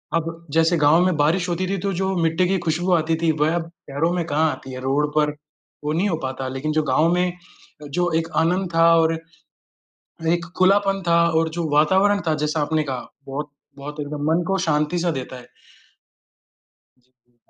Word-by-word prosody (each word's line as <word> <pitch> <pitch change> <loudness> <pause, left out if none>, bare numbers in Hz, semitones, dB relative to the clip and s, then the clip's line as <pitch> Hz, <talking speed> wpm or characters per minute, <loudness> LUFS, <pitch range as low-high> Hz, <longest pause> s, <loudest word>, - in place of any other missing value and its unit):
अब 165 0 -3
जैसे 165 +2 +3
गाँव 160 +4 +4
में 185 - +1
बारिश 165 +5 +2
होती 180 +2 -1
थी, 195 - -1
तो 195 +1 -2
जो 190 +2 -1
मिट्टी 165 +3 +2
की 190 +1 +1
खुशबू 170 +3 0
आती 160 -1 +2
थी 165 -1 +3
वह 160 +3 +2
अब 165 -1 -3 0.2
शहरों 150 +5 0
में 175 -1 -1
कहाँ 160 0 +1
आती 135 - -9
है, 130 - -6
रोड 140 +3 +1
पर 150 -1 +2 0.5
वो 150 +1 -1
नहीं 180 +5 +1
हो 170 - 0
पाता, 130 0 -4
लेकिन 135 +4 -3
जो 155 0 +1
गाँव 155 +4 +2
में 180 0 +1 0.6
जो 175 -1 +1
एक 165 0 -1
आनंद 180 +3 +1
था 165 0 +5
और 165 0 +3 1.2
एक 170 0 +1
खुलापन 195 +1 +3
था 170 0 +4 0.2
और 165 0 +1
जो 165 -2 -1
वातावरण 190 +7 +3
था, 155 - +2
जैसा 150 +1 -1
आपने 155 +1 0
कहा, 130 -3 -5 0.2
बहुत 145 +2 -5 0.3
बहुत 145 +2 -8
एकदम 145 0 -5
मन 170 +2 +2
को 195 - +1
शांति 150 +1 0
सा 175 0 0
देता 130 -3 -5
है। 125 - -12 1.6
जी, 130 - -38 0.2
जी। 120 - -38
160 Hz, 195 wpm, -22 LUFS, 150-175 Hz, 1.6 s, था